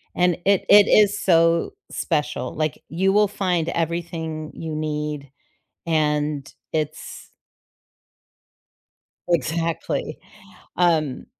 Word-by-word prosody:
and 180 Hz, -1 st, +2 dB
it 200 Hz, -1 st, +3 dB
it 205 Hz, 0 st, +8 dB
is 205 Hz, -1 st, +4 dB
so 165 Hz, -, +3 dB, 0.2 s
special, 150 Hz, -5 st, -2 dB
like, 155 Hz, -1 st, -2 dB
you 190 Hz, +4 st, +1 dB
will 210 Hz, 0 st, +4 dB
find 180 Hz, -5 st, -1 dB
everything 165 Hz, -2 st, -3 dB
you 160 Hz, -1 st, -6 dB
need, 150 Hz, -2 st, -3 dB, 0.6 s
and 150 Hz, -3 st, 0 dB, 0.2 s
it's 155 Hz, -1 st, -4 dB, 2.0 s
Exactly. 165 Hz, +1 st, -1 dB, 0.6 s
Um, 160 Hz, -6 st, +1 dB
160 Hz, 90 wpm, -22 LUFS, 155-175 Hz, 2.0 s, it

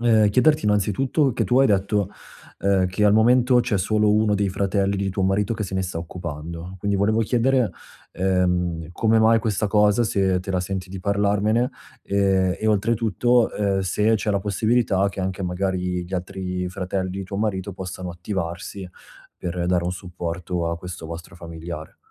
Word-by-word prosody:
ehm, 110 Hz, -3 st, +4 dB
chiederti, 150 Hz, +8 st, +3 dB
innanzitutto 110 Hz, -, +1 dB
che 125 Hz, -, 0 dB
tu 125 Hz, +2 st, +3 dB
hai 135 Hz, -, +6 dB
detto, 100 Hz, 0 st, +1 dB, 0.5 s
uhm, 95 Hz, -2 st, +2 dB
che 95 Hz, +3 st, 0 dB
al 105 Hz, -, +5 dB
momento 125 Hz, +3 st, +5 dB
c'è 115 Hz, -5 st, 0 dB
solo 105 Hz, +2 st, +2 dB
1 105 Hz, -1 st, +3 dB
dei 100 Hz, 0 st, +1 dB
fratelli 100 Hz, +1 st, 0 dB
di 100 Hz, 0 st, -1 dB
tuo 95 Hz, +1 st, -2 dB
marito 100 Hz, +3 st, +1 dB
che 110 Hz, -, -3 dB
se 95 Hz, -, -6 dB
ne 95 Hz, -, 0 dB
sta 90 Hz, -2 st, -4 dB
occupando. 85 Hz, +1 st, -7 dB
Quindi 100 Hz, +1 st, 0 dB
volevo 110 Hz, +3 st, +2 dB
chiedere, 125 Hz, +1 st, +2 dB, 0.4 s
ehm, 90 Hz, -3 st, 0 dB
come 110 Hz, +4 st, +2 dB
mai 115 Hz, +1 st, +5 dB
questa 105 Hz, -1 st, -1 dB
cosa, 105 Hz, +2 st, +3 dB
se 95 Hz, -4 st, +1 dB
te 95 Hz, -, -6 dB
la 90 Hz, -1 st, +1 dB
senti 95 Hz, 0 st, -4 dB
di 95 Hz, -, -6 dB
parlarmene 105 Hz, +5 st, +1 dB, 0.3 s
e 95 Hz, -2 st, +1 dB
e, 110 Hz, -, -1 dB
oltretutto, 115 Hz, +2 st, +2 dB
uhm, 100 Hz, -2 st, +1 dB
se 105 Hz, +4 st, +2 dB
c'è 105 Hz, 0 st, -2 dB
la 100 Hz, -, +1 dB
possibilità 105 Hz, -1 st, +1 dB
che 95 Hz, 0 st, -6 dB
anche, 95 Hz, +1 st, -3 dB
magari, 90 Hz, 0 st, -2 dB
gli 90 Hz, -, -13 dB
altri 90 Hz, 0 st, -3 dB
fratelli 95 Hz, -1 st, -3 dB
di 95 Hz, +1 st, -4 dB
tuo 100 Hz, +1 st, -6 dB
marito 100 Hz, -2 st, -2 dB
possano 90 Hz, -1 st, -6 dB
attivarsi 90 Hz, +1 st, -5 dB, 0.5 s
per 90 Hz, 0 st, -3 dB
dare 90 Hz, -1 st, +1 dB
un 90 Hz, -, -1 dB
supporto 90 Hz, -1 st, -4 dB
a 85 Hz, -, -2 dB
questo 90 Hz, -2 st, -8 dB
vostro 85 Hz, +1 st, -9 dB
familiare. 85 Hz, -2 st, -8 dB
95 Hz, 175 wpm, -23 LUFS, 90-105 Hz, 0.5 s, hai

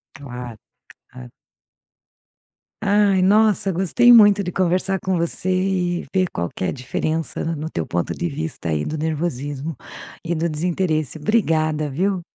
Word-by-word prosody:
Claro, 125 Hz, -4 st, -8 dB, 0.5 s
claro. 60 Hz, -1 st, -12 dB, 1.5 s
Ai, 200 Hz, -2 st, +3 dB
nossa, 205 Hz, 0 st, +3 dB
gostei 195 Hz, +7 st, +4 dB
muito 205 Hz, -3 st, +7 dB
de 180 Hz, -, -4 dB
conversar 185 Hz, +2 st, 0 dB
com 190 Hz, 0 st, -1 dB
você 170 Hz, +2 st, -2 dB
e 185 Hz, -1 st, 0 dB
ver 185 Hz, -1 st, +2 dB
qual 85 Hz, 0 st, -3 dB
que -, -, -6 dB
é -, -, 0 dB
a -, -, -1 dB
diferença, 155 Hz, +6 st, -3 dB
no 155 Hz, +2 st, -5 dB
teu 80 Hz, -, -3 dB
ponto 85 Hz, 0 st, -2 dB
de 175 Hz, -, -2 dB
vista, 155 Hz, -, -5 dB
aí, 75 Hz, -1 st, 0 dB
do 155 Hz, -, -4 dB
nervosismo 150 Hz, -1 st, -3 dB, 0.5 s
e 170 Hz, -, -1 dB
do 165 Hz, +1 st, -1 dB
desinteresse. 155 Hz, -2 st, -1 dB
Obrigada, 155 Hz, -5 st, +1 dB
viu. 185 Hz, +5 st, 0 dB
165 Hz, 145 wpm, -21 LUFS, 150-190 Hz, 1.5 s, muito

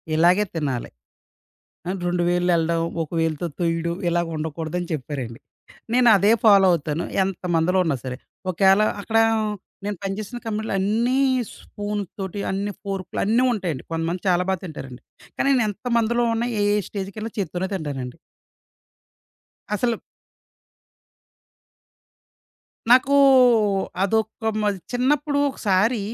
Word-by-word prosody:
ఇలాగే 175 Hz, +6 st, +4 dB
తినాలి. 140 Hz, -6 st, -2 dB, 1.0 s
ఆహ్, 190 Hz, +1 st, -2 dB
2 175 Hz, 0 st, 0 dB
వేళ్లు 175 Hz, 0 st, +1 dB
వెళ్ళడం, 165 Hz, 0 st, +1 dB, 0.2 s
ఒక 155 Hz, -, -10 dB
వేలుతో 165 Hz, +1 st, -1 dB
తొయ్యడం 170 Hz, 0 st, 0 dB
ఇలా 170 Hz, 0 st, +2 dB
ఉండకూడదని 160 Hz, +3 st, -4 dB
చెప్పారండి. 130 Hz, -5 st, -5 dB, 0.5 s
నేను 250 Hz, -1 st, +4 dB
అదే 200 Hz, +3 st, +4 dB
ఫాలో 200 Hz, -3 st, +7 dB
అవుతాను. 160 Hz, -1 st, -1 dB, 0.2 s
ఎంతమందిలో 180 Hz, -1 st, 0 dB
ఉన్నా 160 Hz, -4 st, +1 dB
సరే. 125 Hz, -1 st, -4 dB, 0.3 s
ఒకేళ 195 Hz, +3 st, +4 dB, 0.2 s
అక్కడ 225 Hz, +2 st, 0 dB, 0.7 s
నేను 205 Hz, 0 st, -2 dB
పనిచేసిన 200 Hz, +4 st, -4 dB
కంపెనీలో 220 Hz, -1 st, -3 dB
అన్నీ 230 Hz, +7 st, +1 dB, 0.4 s
స్పూనుతోటి 205 Hz, -2 st, -5 dB
అన్నీ 200 Hz, +2 st, -2 dB
ఫోర్కులు 195 Hz, -2 st, -4 dB
అన్నీ 230 Hz, +5 st, +3 dB
ఉంటాయండి. 175 Hz, -, -3 dB
కొంతమంది 165 Hz, +2 st, -2 dB
చాలా 180 Hz, 0 st, +3 dB
బా 190 Hz, -, +2 dB
తింటారండి. 135 Hz, -7 st, -8 dB, 0.4 s
కానీ 275 Hz, -, +1 dB
నేనెంతమందిలో 235 Hz, +2 st, 0 dB
ఉన్నా 230 Hz, +1 st, -1 dB
ఏ -, -, +2 dB, 0.3 s
స్టేజీకేళ్ళినా 205 Hz, +2 st, -5 dB
చేత్తోనే 185 Hz, 0 st, -2 dB
తింటానండి. 140 Hz, -8 st, -4 dB, 1.6 s
అసలు 235 Hz, +3 st, +1 dB, 3.0 s
నాకు 260 Hz, +3 st, +5 dB, 0.9 s
అదొక 220 Hz, +2 st, -1 dB, 0.2 s
మా 210 Hz, -, +2 dB, 0.2 s
చిన్నప్పుడు 285 Hz, +4 st, +1 dB
ఒకసారి 210 Hz, -1 st, +1 dB
190 Hz, 110 wpm, -23 LUFS, 165-215 Hz, 3.0 s, ఫాలో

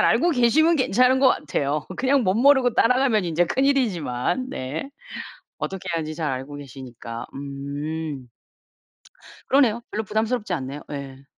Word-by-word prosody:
잘 -, -, +4 dB
알고 350 Hz, -, +3 dB
계시면 315 Hz, +5 st, +4 dB
괜찮은 255 Hz, 0 st, +3 dB
것 265 Hz, -, +7 dB
같아요. 145 Hz, -, -1 dB
그냥 265 Hz, 0 st, +2 dB
멋모르고 245 Hz, +6 st, +4 dB
따라가면 250 Hz, -4 st, +3 dB
인제 170 Hz, +1 st, +2 dB
큰일이지만. 255 Hz, -, 0 dB
네. 150 Hz, -, -5 dB, 0.7 s
어떻게 190 Hz, -1 st, -5 dB
하는지 155 Hz, -1 st, -2 dB
잘 155 Hz, -2 st, -2 dB
알고 135 Hz, +3 st, -5 dB
계시니까. 125 Hz, -4 st, -8 dB
음. 140 Hz, 0 st, -5 dB, 1.2 s
그러네요. 240 Hz, -4 st, +3 dB
별로 215 Hz, -, -2 dB
부담스럽지 220 Hz, 0 st, -1 dB
않네요. 140 Hz, -1 st, -5 dB
예. 140 Hz, -1 st, -7 dB
180 Hz, 315 characters per minute, -23 LUFS, -, 1.2 s, 것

